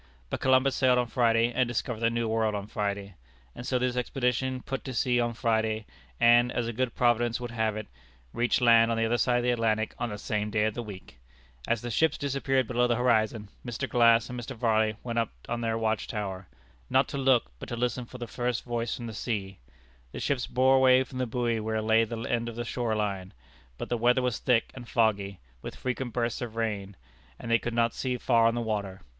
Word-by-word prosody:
But - - -2
Columbus 130 +1 +3
sailed 130 -2 +3
on 125 - +2
Friday, 115 0 +2
and 125 0 +2
discovered 120 -1 -3
the 115 0 +2
New 115 0 -1
World 110 -1 +1
on 100 -1 -4
Friday; 100 -1 -3 0.4
and 120 - -8
so 130 - +1
this 125 0 0
expedition 125 +1 -1
put 135 -1 -4
to 130 -2 -5
sea 125 +1 +2
on 120 -1 0
Friday, 110 -2 0 0.3
and, 120 +1 +5
as 120 -1 -1
a 120 - -3
good 125 +1 -2
Providence 120 -1 +2
would 120 -1 -6
have 110 -2 -1
it, 110 - -5 0.5
reached 120 +1 +1
land 115 -1 +6
on 115 - 0
the 115 - +2
other 120 +1 +1
side 125 -1 +2
of 120 - 0
the 125 - +2
Atlantic 110 -2 0
on 120 - -1
the 105 - -5
same 105 +1 -2
day 105 0 +1
of 110 - 0
the 120 - -4
week! 100 - -10 0.5
As 115 0 0
the 120 - -4
ships 160 +8 +2
disappeared 135 -2 0
below 125 +1 +1
the 120 - +2
horizon, 110 -3 +1
Mr. 125 +2 -4
Glass 115 -2 +4
and 125 0 -6
Mr. 125 +3 -7
Varley 110 -2 +1
went 115 -1 -1
up 115 - 0 0.2
on 120 0 -3
their 115 -1 0
watch 110 -1 -1
tower 95 -4 -5 0.4
not - - +3
to 140 - -4
look, 130 - +3
but - - -8
to 120 - -3
listen 125 +1 -1
for 125 - -10
the 120 - -5
first 120 0 -2
voice 120 -1 -2
from 120 - -7
the 115 - -6
sea. 100 -4 -4 0.5
The - - -5
ships 135 -3 -1
bore 130 +1 +4
away 130 0 +5
for 130 - -16
the 130 -1 -1
buoy 120 -1 -1
where 110 0 -2
lay 110 +1 +3
the 115 +1 -6
end 120 0 -1
of 115 - -8
the 120 0 -4
shore 115 -2 -1
line; 100 -3 -3 0.4
but - - -6
the 120 - 0
weather 125 +2 +3
was 125 -3 -1
thick 120 -3 +1
and 120 -2 -10
foggy, 100 -4 +1 0.2
with - - -7
frequent 125 -1 -3
bursts 120 +1 -2
of 115 -2 -5
rain, 105 -4 -3 0.4
and 115 - -6
they 115 - +5
could 120 -1 -4
not 115 0 +2
see 125 -1 -2
far 115 -2 +3
on 115 - +1
the 120 - -1
water. 100 -4 -3
115 Hz, 230 wpm, -28 LUFS, 110-125 Hz, 0.5 s, land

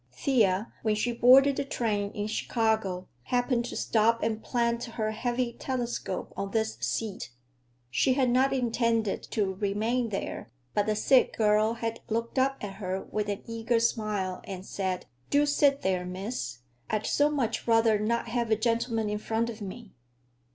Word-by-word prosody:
Thea, 210 - +1
when 215 -1 +1
she 240 +3 0
boarded 265 +4 +6
the - - 0
train 215 -7 -1
in 205 - -2
Chicago, 220 -4 0 0.2
happened 245 -1 +1
to - - -6
stop 230 +1 +2
and 220 0 -1
plant 235 -1 0
her 225 -2 -2
heavy 240 +2 -1
telescope 240 -7 -3
on 200 - -3
this 220 +1 -1
seat. 220 -4 -3 0.6
She 260 - +3
had 255 -2 +2
not 260 +2 +3
intended 230 -4 +1
to 200 -3 0
remain 215 +5 0
there, 195 - -4 0.2
but 205 0 +1
the 215 - +1
sick 260 +4 +3
girl 215 0 +3
had 230 0 -3
looked 230 +3 -1
up 270 +1 +2
at 195 -2 -6
her 190 0 -2
with 210 -1 -1
an 200 - -3
eager 230 +1 0
smile 210 -5 -1
and 190 -1 -7
said, 190 -3 -3 0.2
"Do 290 +1 +4
sit 285 -1 +3
there, 185 -1 +1
miss. 185 - -5 0.3
I'd 215 -1 -1
so 290 +1 +3
much 250 -8 -1
rather 225 -2 +4
not 235 +3 0
have 235 -1 -1
a 220 - +4
gentleman 230 0 0
in 210 0 -2
front 225 +2 -1
of 220 -1 -11
me." 205 +2 -8
225 Hz, 165 wpm, -28 LUFS, 210-240 Hz, 0.6 s, boarded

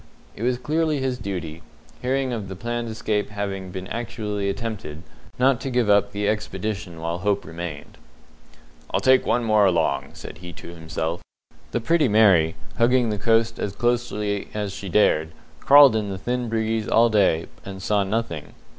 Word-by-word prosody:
It - - -10
was 125 +1 +1
clearly 155 +3 0
his 130 -1 -2
duty 85 -5 -5 0.4
hearing 130 0 0
of 110 -4 -4
the 95 - -7
planned 120 +3 -3
escape 110 -2 -2
having 100 -2 -4
been 95 0 -6
actually 110 -4 -3
attempted 100 -7 -5 0.3
not 130 0 +3
to 135 - -3
give 120 -4 +2
up 100 0 +3
the 100 0 -2
expedition 100 -4 -3
while 85 +1 -3
hope 100 -1 0
remained. 80 -2 -7 0.9
"I'll - - 0
take 130 0 +4
one 120 +1 +2
more 110 -3 +4
look 90 -2 +2
along," 80 -4 -1
said 80 - -10
he 90 -1 -9
to - - -11
himself. 80 +1 -4 0.5
The 120 - -2
Pretty 160 +3 +3
Mary, 100 -7 +4 0.2
hugging 120 -1 +3
the 105 - -3
coast 115 +1 +2
as 100 -1 -3
closely 105 -3 -1
as 105 -2 -3
she 100 0 -7
dared, 80 -5 +2 0.3
crawled 140 - +7
in 105 -2 -1
the 95 - -4
thin 120 +4 -2
breeze 110 -1 -1
all 115 +1 +4
day, 95 -6 +3 0.2
and 95 -1 -8
saw 100 +1 +1
nothing. 100 -6 -3
105 Hz, 170 wpm, -23 LUFS, 95-120 Hz, 0.9 s, crawled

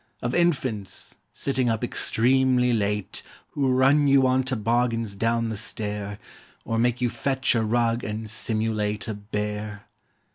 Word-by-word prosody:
Of 120 +1 -1
infants, 130 - -1
sitting 130 -3 0
up 115 +1 -1
extremely 125 +1 +2
late, 105 -3 -1 0.3
Who 135 -2 0
run 135 +3 +4
you 135 -1 +5
on 130 0 +3
toboggans 115 -2 0
down 115 +2 0
the 110 - -3
stair; 105 -1 -4 0.5
Or 115 0 -1
make 120 +1 +1
you 120 - +2
fetch 130 +2 +1
a 115 -2 +1
rug 115 +1 +1
and 110 +1 -4
simulate 110 -1 -1
A 110 - -2
bear. 105 0 -5
115 Hz, 140 wpm, -25 LUFS, 105-130 Hz, 0.5 s, you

